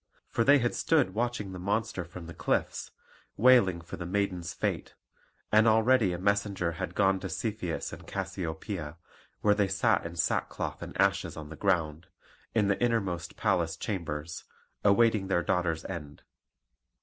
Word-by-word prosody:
For 115 - +1
they 140 +4 +7
had 120 -3 0
stood 145 - +2
watching 115 -3 -2
the 90 - -7
monster 105 0 -1
from 85 0 -10
the 85 - -8
cliffs, - - -1 0.5
wailing 105 -7 +5
for 85 - -8
the 85 - -5
maiden's 90 -2 -1
fate. - - -3 0.6
And 110 +2 +5
already 110 -1 +4
a 90 - -2
messenger 100 -2 0
had 90 +3 -5
gone 95 -1 +3
to 95 0 -5
Cepheus 100 -2 -3
and - - -10
Cassiopoeia, 90 -3 -4 0.4
where 105 - +4
they 100 -1 +2
sat 95 0 +2
in 85 +1 -6
sackcloth - - -1
and - - -8
ashes 100 -4 +1
on 75 -1 -7
the 80 - -8
ground, 85 -4 0 0.5
in 105 -3 +3
the 100 -1 0
innermost 100 -8 -1
palace 85 -2 +1
chambers, 85 -5 -4 0.4
awaiting 105 -1 +4
their 90 -2 +1
daughter's 85 -4 0
end. 75 -6 -7
95 Hz, 155 wpm, -29 LUFS, 85-105 Hz, 0.6 s, they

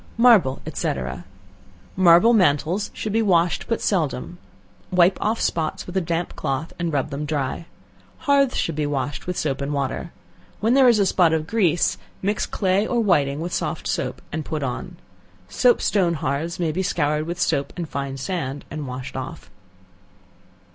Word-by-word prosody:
Marble, 225 - +5
&c. - - -1 1.0
Marble 185 +5 +6
mantles 180 0 +2
should 215 - -4
be 225 - +3
washed 175 -5 +2
but 230 - -1
seldom; 170 -2 -1 0.5
wipe 180 +1 +4
off 220 +2 0
spots 160 -2 -1
with 180 - -9
a 190 - +2
damp 170 +1 -2
cloth, 135 +4 -3
and 170 -1 -1
rub 145 0 -1
them 140 +2 -3
dry. 150 +2 -3 0.6
Hearths 280 -2 +3
should 165 - 0
be 150 0 -1
washed 145 +1 -3
with 180 - -2
soap 140 -2 -1
and 140 +1 -2
water. 140 +5 -3 0.5
When 225 +3 +2
there 265 -1 +6
is 235 - +4
a 200 - +3
spot 175 -3 +3
of 155 -1 0
grease, 175 -4 +1 0.2
mix 205 +2 0
clay 195 +2 +1
or 245 - 0
whiting 150 -9 +2
with 175 +1 -4
soft - - -2
soap, - - -3
and 160 0 -3
put 150 0 -4
on. 125 -2 -4 0.5
Soap 245 - +3
stone 180 -5 +1
hearths 155 +5 -2
may 165 -3 0
be 180 +5 -2
scoured 150 -4 0
with 175 +1 -4
soap 140 -5 0
and 170 -2 -3
fine 140 -2 -4
sand, 140 -3 -4
and 150 -1 -5
washed 130 +1 -6
off. 135 +5 -7
170 Hz, 170 wpm, -23 LUFS, 145-190 Hz, 1.0 s, Marble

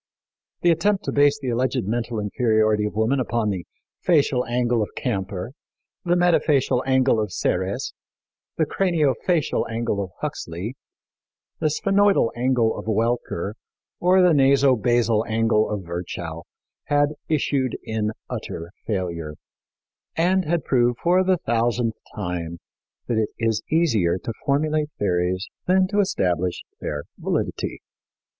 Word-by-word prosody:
The 175 - +6
attempt 190 +5 +1
to - - -2
base 145 0 +4
the 135 -3 -3
alleged 125 +1 0
mental 115 +2 -2
inferiority 110 0 +2
of 105 - -7
woman 110 +6 +2
upon 120 -4 0
the 90 -4 -5 0.3
facial 140 -7 +3
angle 120 -1 +1
of 105 - -1
Camper, 95 +2 -3 0.5
the 175 0 +2
metafacial 150 -7 +3
angle 130 -3 +3
of 105 -3 -2
Serres, 95 +2 -1 0.6
the 160 - +3
craniofacial 165 -2 +1
angle 115 -3 -1
of 95 - -7
Huxley, 90 +10 -5 0.8
the 155 - +2
sphenoidal 195 - +3
angle 120 -2 +2
of - - -8
Welcker, 110 -3 -1 0.5
or 185 +1 +4
the 180 -2 +5
nasobasal 125 -5 +3
angle 110 -1 +2
of 105 -2 -3
Virchow 85 -1 -5 0.4
had 145 0 +3 0.2
issued 140 -5 0
in 110 -1 -1 0.2
utter 85 +1 -6 0.2
failure, 85 -7 -3 0.8
and 185 +2 +2
had 170 +1 0
proved 120 -2 +2
for 180 +2 +3
the 185 0 +3
thousandth 120 -3 0 0.2
time 90 -4 -4 0.5
that 115 -2 +1
it 110 - 0
is 115 -1 0
easier 115 - +2
to 110 +5 -5
formulate 150 +2 +1
theories 90 0 0 0.2
than 185 +1 +4
to 205 0 +1
establish 90 - 0 0.2
their 75 -1 -4 0.2
validity. - - -2
120 Hz, 130 wpm, -23 LUFS, 105-145 Hz, 0.8 s, The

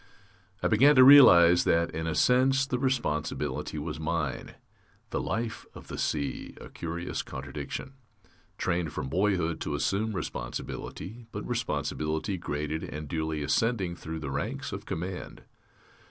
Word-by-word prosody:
I - - +4
began 140 +7 +5
to 130 - +9
realize 90 -11 +9
that, 85 0 +2
in 80 +1 -3
a 80 - -1
sense, 130 - +4
the 125 -2 -2
responsibility 75 - -1
was 75 +1 -4
mine. 80 -4 -3 0.6
The - - -1
life 115 +6 -3
of - - -12
the - - -5
sea 75 -2 -2
a - - -10
curious 85 +1 -4
contradiction. 70 - -6 0.6
Trained 85 -3 -1
from 65 - -4
boyhood 90 -2 0
to - - -2
assume 110 +3 0
responsibility, 95 - -6
but - - -6
responsibility 80 +5 -2
graded 75 0 -3
and 75 0 -6
duly 80 -1 -2
ascending 95 0 0
through 80 -1 -6
the 70 -3 -4
ranks 70 +1 -3
of - - -7
command. 90 +2 -5
85 Hz, 140 wpm, -28 LUFS, 75-110 Hz, 0.6 s, to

